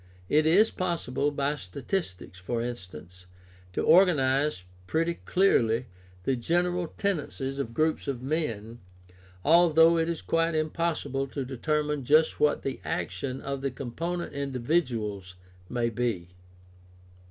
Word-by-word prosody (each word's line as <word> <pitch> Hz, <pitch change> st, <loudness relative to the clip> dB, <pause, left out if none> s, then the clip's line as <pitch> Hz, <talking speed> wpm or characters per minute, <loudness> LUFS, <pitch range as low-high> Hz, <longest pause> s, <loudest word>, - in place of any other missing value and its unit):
It 155 Hz, +1 st, +4 dB
is 200 Hz, +7 st, +5 dB
possible, 155 Hz, -6 st, -1 dB
by 145 Hz, +1 st, -1 dB
statistics, 95 Hz, -, -5 dB
for 115 Hz, +6 st, -2 dB
instance, 90 Hz, -6 st, -8 dB, 0.5 s
to -, -, -1 dB
organize 150 Hz, -, +4 dB, 0.2 s
pretty 165 Hz, -, 0 dB
clearly 125 Hz, -, +3 dB, 0.4 s
the 135 Hz, -, +1 dB
general 175 Hz, +7 st, 0 dB
tendencies 145 Hz, -8 st, -2 dB
of 115 Hz, -4 st, -4 dB
groups 155 Hz, 0 st, +1 dB
of 135 Hz, -3 st, -2 dB
men, 120 Hz, -7 st, -3 dB, 0.7 s
although 165 Hz, 0 st, +6 dB
it 165 Hz, +1 st, 0 dB
is 170 Hz, -, -4 dB
quite 165 Hz, 0 st, +1 dB
impossible 155 Hz, -3 st, -1 dB
to 135 Hz, 0 st, -4 dB
determine 150 Hz, +3 st, -1 dB
just 155 Hz, +5 st, +3 dB
what 150 Hz, 0 st, +2 dB
the 135 Hz, -, -3 dB
action 130 Hz, -1 st, -3 dB
of 140 Hz, 0 st, -4 dB
the 135 Hz, -, 0 dB
com 130 Hz, -1 st, -7 dB
ponent 170 Hz, +4 st, -3 dB
individuals 120 Hz, -, -2 dB, 0.3 s
may 120 Hz, -1 st, 0 dB
be. 110 Hz, -7 st, -2 dB
140 Hz, 125 wpm, -28 LUFS, 120-165 Hz, 0.7 s, although